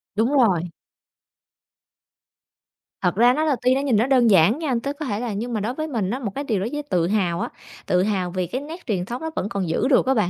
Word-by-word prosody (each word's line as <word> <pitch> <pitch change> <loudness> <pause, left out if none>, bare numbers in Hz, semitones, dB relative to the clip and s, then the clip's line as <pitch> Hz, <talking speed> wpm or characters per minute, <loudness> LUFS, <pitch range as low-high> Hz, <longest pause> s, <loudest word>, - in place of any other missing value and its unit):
Đúng 225 +5 +1
rồi. 195 - +3 2.3
Thật 180 -2 +1
ra, 240 +4 +5
nó 305 +4 0
là 305 -3 +2
tuy 255 +1 +3
nó 270 - 0
nhìn 275 -5 +1
nó 225 +4 +2
đơn 255 -3 +4
giản 195 - +5
nha, 295 -6 -1
tức 280 +1 -3
có 305 - -3
thể 210 -5 -2
là 235 -2 -3
nhưng 235 +4 -4
mà 220 - 0
đối 215 +4 -2
với 310 +3 -4
mình 225 -10 -2
á, 250 - -2
một 220 -7 -4
cái 280 - -3
điều 225 -8 -1
đối 200 +5 -2
với 295 0 -3
tự 180 -12 0
hào 180 -4 0
á, - - -2 0.4
tự 180 0 +2
hào 190 -3 -1
vì 185 -1 -2
cái 255 +10 -4
nét 320 +5 -9
truyền 190 -7 -1
thống 240 +5 -5
nó 320 - -3
vẫn 200 - -2
còn 195 -6 -2
giữ 165 - +1
được 265 - +4
á 265 - +3
bạn, 215 -8 +1
230 Hz, 260 wpm, -23 LUFS, 190-270 Hz, 2.3 s, ra